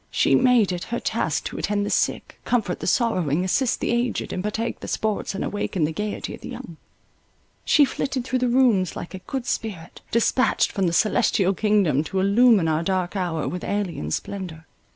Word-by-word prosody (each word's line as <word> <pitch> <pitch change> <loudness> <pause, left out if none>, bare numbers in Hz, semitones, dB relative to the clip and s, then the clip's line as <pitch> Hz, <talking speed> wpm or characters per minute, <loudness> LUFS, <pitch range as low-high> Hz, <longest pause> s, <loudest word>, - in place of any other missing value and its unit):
She - - +2
made 250 -6 +4
it 180 -1 -4
her 235 - -3
task 165 -9 -1
to - - -5
attend 205 -1 0
the - - -3
sick, - - -1
comfort 220 -7 0
the - - -5
sorrowing, 180 - +1
assist 245 +6 +1
the - - -1
aged, 240 0 -1
and 185 - -2
partake 220 +3 -3
the - - -8
sports 215 -2 -2
and - - -2
awaken 200 -4 -2
the 150 - +1
gaiety 210 +6 -4
of - - -10
the - - -8
young. 165 - -9 0.9
She 295 - +5
flitted 270 -1 -3
through 255 0 0
the 250 - +1
rooms, 235 -8 +3
like 175 - -7
a 190 - -6
good 250 +6 -5
spirit, 190 -10 -4
dispatched 235 +2 +2
from 195 -3 0
the - - +1
celestial 210 -1 +2
kingdom, 195 -8 +2
to 190 +5 -2
illumine 200 -1 +4
our 160 0 +1
dark 185 +1 -1
hour 175 -5 -2
with 180 - -4
alien 180 - -2
splendour. 165 - -5
200 Hz, 195 wpm, -23 LUFS, 175-235 Hz, 0.9 s, She